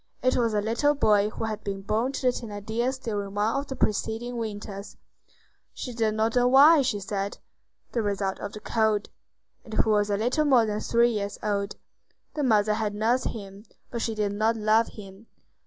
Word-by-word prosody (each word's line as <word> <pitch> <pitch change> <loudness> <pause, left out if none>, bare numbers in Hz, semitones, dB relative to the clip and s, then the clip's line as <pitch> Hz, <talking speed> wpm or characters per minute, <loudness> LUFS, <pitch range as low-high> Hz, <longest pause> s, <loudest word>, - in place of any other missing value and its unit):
It 255 - +3
was 230 -3 +1
a 210 - +2
little 265 +7 +2
boy 210 -6 +3
who 215 - -6
had 215 -1 -3
been 195 -1 -4
born 225 +6 0
to - - -4
the - - +3
Thénardiers 235 +3 -3
during 205 -3 -3
one 210 +3 +1
of 275 +1 -2
the 265 - -5
preceding 225 +3 -1
winters,—"she 210 +3 -9
did 220 -2 0
not 220 +2 0
know 245 0 +4
why," 285 +5 +7
she 245 -6 0
said, 200 0 -3 0.5
"the 235 - 0
result 200 -2 -2
of 205 - -6
the 215 - -8
cold,"—and 220 +1 -3
who 220 - +2
was 205 -1 +2
a 200 - +1
little 250 +8 +1
more 255 -6 +5
than 210 -1 -2
three 235 +2 +3
years 205 -2 -3
old. 200 -1 -1 0.6
The 300 - -2
mother 215 -5 +3
had 210 -1 -2
nursed 230 +4 +1
him, 200 -1 -8 0.3
but 235 - -3
she 225 -1 -2
did 210 -1 0
not 220 +3 +1
love 220 +1 +3
him. 200 +1 -12
220 Hz, 190 wpm, -26 LUFS, 205-240 Hz, 0.6 s, why